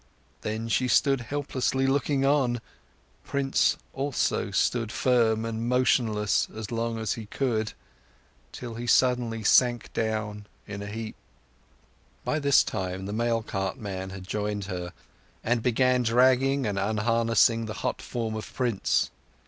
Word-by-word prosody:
Then 110 +2 -3
she 125 +3 +1
stood 135 +1 +3
helplessly 135 0 -1
looking 135 0 +1
on. 135 -4 +2 0.6
Prince 140 -1 +1 0.2
also 135 -5 0
stood 115 +4 0
firm 115 -5 +2
and 115 +1 -3
motionless 115 -5 +2
as 110 0 -6
long 115 0 -1
as 110 -2 -1
he 115 -3 -7
could; 110 -3 -1 0.8
till 120 -2 -7
he 120 +2 -6
suddenly 120 -3 +2
sank 120 +2 +3
down 110 -2 -2 0.2
in 100 0 -6
a 100 - -6
heap. 110 +1 -6 1.1
By 155 - 0
this 140 -2 +5
time 95 -2 -4
the 100 - -4
mail 115 0 0
cart 95 -3 -3
man 95 -2 -5
had 95 -1 -8
joined 105 -1 -2
her, 90 -2 -5 0.5
and 120 0 +1
began 125 +1 +3
dragging 130 +3 +3
and 100 -2 -1
unharnessing 115 +2 +2
the 110 - -4
hot - - -1
form 115 -2 -3
of 110 0 -6
Prince. 120 -6 +1
115 Hz, 140 wpm, -27 LUFS, 105-125 Hz, 1.1 s, this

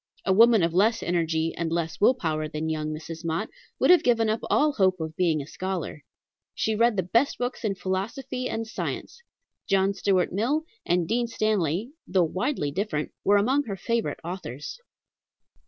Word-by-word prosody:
A 190 - +3
woman 225 -1 +6
of 165 0 +1
less 220 +5 +3
energy 165 -2 0
and 165 -1 -2
less 165 +1 -2
will 250 +5 +6
power 155 -8 -2
than 155 +1 -3
young 155 -1 -2
Mrs. 160 +2 -7
Mott 165 +6 -2 0.3
would - - +4
have 360 - +7
given 230 -2 +2
up 220 - -1
all 300 +1 +3
hope 185 -6 +2
of 160 -1 -5
being 160 -5 +1
a - - -11
scholar. 180 -3 -5 0.5
She 220 - 0
read 230 0 +3
the 185 - +2
best 230 +10 +1
books 245 0 -3
in 205 -3 0
philosophy 230 +8 -3
and 225 0 -3
science. 225 - -5 0.5
John 195 0 +3
Stuart 190 -3 +1
Mill 255 +11 +1 0.2
and 175 -1 +2
Dean 240 +3 +1
Stanley, 215 - 0 0.2
though 185 -1 +3
widely 185 - -1
different, 155 -3 -2
were 205 +1 +5
among 265 +8 +2
her 200 -3 -4
favorite 230 +4 -1
authors. 170 - -6
190 Hz, 175 wpm, -26 LUFS, 165-230 Hz, 0.5 s, have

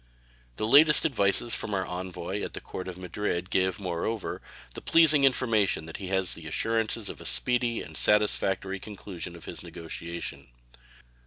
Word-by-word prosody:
The 110 - -1
latest 150 +7 +7
advices 115 -4 +2
from 105 - -2
our 95 -1 0
envoy 90 +2 -4
at - - -5
the - - -3
Court 95 - -7
of 90 -1 -6
Madrid 90 0 -3
give, 95 0 +1
moreover, 95 +4 -3 0.3
the - - -8
pleasing 155 -4 +5
information 110 -10 +2
that 80 - -7
he 95 - -6
had 95 0 +1
assurances 110 +7 -2
of - - -8
a - - -9
speedy 120 -2 +1
and - - -11
satisfactory 95 -2 +1
conclusion 95 -4 -7
of 85 - -12
his - - -7
negotiation. 85 -1 -7
95 Hz, 155 wpm, -28 LUFS, 90-115 Hz, 0.3 s, latest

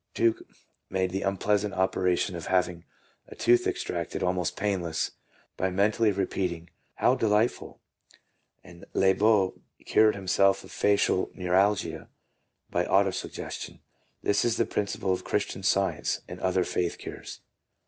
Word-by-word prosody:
Tuke 115 -1 +2 0.5
made 95 -1 0
the 95 +1 -2
unpleasant 100 +1 0
operation 95 0 +1
of 85 - -6
having 90 -2 0 0.4
a - - -11
tooth 120 +1 +3
extracted - - -3
almost 90 -2 -1
painless 95 -6 -1 0.5
by 95 - 0
mentally 105 +4 +2
repeating, 90 -3 -2
" - - -43
How - - +3
de 110 - 0
lightful!" 105 +3 0 0.9
and 85 - -14
Liebeault 95 0 +3 0.3
cured 110 0 +4
himself 100 0 +2
of - - -13
facial 100 -2 +2
neuralgia 95 +2 +1 0.6
by - - +1
auto - - +3
suggestion. - - -6 0.4
This 100 - +2
is 120 -1 +1
the 115 - +2
principle 100 -2 -1
of 90 - -4
Christian 105 -2 -2
science 95 0 0
and - - -8
other 95 0 +1
faith 90 -1 -2
cures. - - -9
95 Hz, 135 wpm, -27 LUFS, 90-105 Hz, 0.9 s, cured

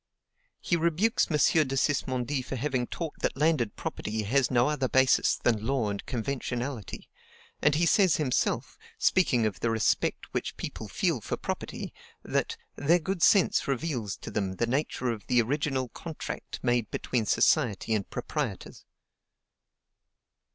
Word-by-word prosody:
He 175 - 0
rebukes 170 +7 +2
M. 155 - +1 0.3
de 135 - -2
Sismondi 130 0 0
for 135 - -5
having 130 -1 -1
taught 165 -3 -5
that - - -1
landed 145 -7 +1
property 110 0 -3
has 130 +5 +2
no 120 -1 +3
other 140 -4 0
basis 130 0 +4
than 110 -3 0
law 125 -3 0
and 100 - -5
conventionality; 125 -2 -4 0.5
and 150 0 +4
he 170 +3 +2
says 190 0 +4
himself, 140 -5 -1 0.2
speaking 130 -11 +3
of 105 -3 -2
the 115 - 0
respect 110 -1 +1
which - - -3
people - - -6
feel - - 0
for - - -3
property, - - -5 0.3
that - - -1 0.2
"their 160 +5 +3
good 180 +1 -3
sense 195 +1 +4
reveals 130 -7 -2
to - - -8
them 95 -2 -2
the 115 - 0
nature 130 -1 -1
of 110 -3 -7
the 125 -1 +3
ORIGINAL 130 +1 0
CONTRACT 160 +4 -7
made 120 -3 +1
between 115 -4 -2
society 115 -6 +2
and 105 -3 -1
proprietors." - - -4
130 Hz, 145 wpm, -28 LUFS, 115-150 Hz, 0.5 s, basis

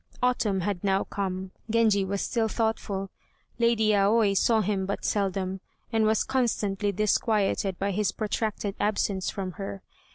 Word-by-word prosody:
Autumn 220 -6 +1
had 190 -1 -2
now 195 -1 +2
come; 190 -1 -4 0.2
Genji 215 -3 +3
was 195 +1 -2
still 230 -3 0
thoughtful. 215 -4 -2 0.5
Lady 225 -2 +3
Aoi 205 +1 +4
saw 220 +3 +3
him 195 -2 -1
but 200 - -3
seldom, 190 -2 -1 0.3
and 220 -1 +3
was 220 0 +3
constantly 210 -6 0
disquieted 205 -1 +1
by 200 +1 -1
his 205 0 0
protracted 215 -1 -2
absence 200 -2 0
from 190 -2 -4
her. 195 0 -6
200 Hz, 140 wpm, -27 LUFS, 195-220 Hz, 0.5 s, Aoi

